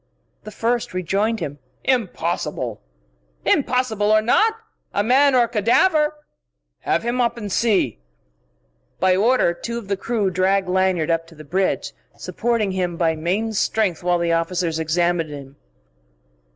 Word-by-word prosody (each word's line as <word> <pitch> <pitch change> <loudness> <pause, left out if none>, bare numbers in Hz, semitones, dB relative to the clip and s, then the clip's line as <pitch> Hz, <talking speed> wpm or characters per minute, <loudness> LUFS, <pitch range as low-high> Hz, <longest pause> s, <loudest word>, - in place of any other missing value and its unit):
The - - -6
first 230 -1 -2
rejoined 200 +4 0
him. 145 -2 -5 0.2
"Impossible!" 170 - -2 0.6
"Impossible 225 -5 +1
or 215 - +6
not 435 - +3 0.4
a 205 - +2
man 265 +4 +4
or 245 - +5
a - - 0
cadaver!" 300 - +2 0.6
"Have - - 0
him 240 +2 0
up 235 0 0
and 210 -3 -6
see...." 195 - +1 1.0
By 185 -1 +3
order, 220 -2 +3
two 235 +7 -5
of 215 -4 -8
the 200 - 0
crew 205 -2 -1
dragged 190 +1 +1
Lanyard 180 -3 +1
up 165 0 -1
to 165 - -16
the 155 - -11
bridge, 185 +6 -1 0.2
supporting 230 -4 -1
him 180 -2 -2
by 165 -2 +1
main 190 +8 -1
strength 205 -4 0
while 175 0 +1
the 170 -1 0
officers 165 -1 -1
examined 165 +1 0
him. 140 -2 -9
190 Hz, 145 wpm, -21 LUFS, 170-230 Hz, 1.0 s, or